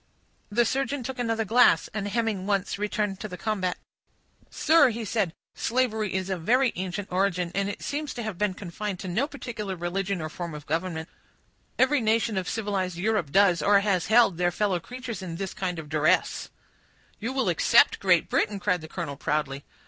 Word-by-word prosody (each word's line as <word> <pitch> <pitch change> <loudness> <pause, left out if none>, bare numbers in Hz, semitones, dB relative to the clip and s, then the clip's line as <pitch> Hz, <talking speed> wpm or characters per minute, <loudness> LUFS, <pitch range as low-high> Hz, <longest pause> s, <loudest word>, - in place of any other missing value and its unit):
The 235 +3 +2
surgeon 270 +2 -1
took 255 +1 -5
another 225 -2 0
glass, 215 -7 +5
and 205 -1 -2
hemming 210 -3 -1
once, 200 -1 0
returned 210 -1 -1
to 215 - -5
the 180 -3 -8
combat. 190 -3 -1 0.7
"Sir," 320 -5 +4
said 205 -3 0
he, - - -20 0.2
"slavery 220 -5 0
is 190 0 -2
of 180 -3 -2
very 250 +7 +3
ancient 190 +2 -4
origin, 180 -2 0
and 200 +1 0
it 205 - -6
seems 295 0 -3
to 240 - -4
have 220 -3 -4
been 200 0 0
confined 200 +1 -5
to 190 - -6
no 220 +11 0
particular 230 -9 -5
religion 185 +2 -2
or 155 - -3
form 170 0 -6
of 150 -1 -9
government; 165 +1 -2 0.7
every 270 +1 +3
nation 220 0 +1
of 185 -1 -2
civilized 195 -5 -2
Europe 200 -6 0
does, 185 -2 +4
or 200 +4 +5
has 195 -4 +1
held 220 -6 +4
their 175 0 +3
fellow 185 0 0
creatures 240 +1 -7
in 175 -3 -5
this 190 +2 -4
kind 180 -2 -3
of 160 -2 -7
duresse." 155 +1 +1 0.7
"You 230 +4 -3
will 265 0 0
except - - +4
Great - - +3
Britain," 205 -1 0
cried 180 -3 0
the 160 - -8
colonel, 160 -4 -5
proudly. 140 -2 -2
200 Hz, 185 wpm, -26 LUFS, 180-225 Hz, 0.7 s, glass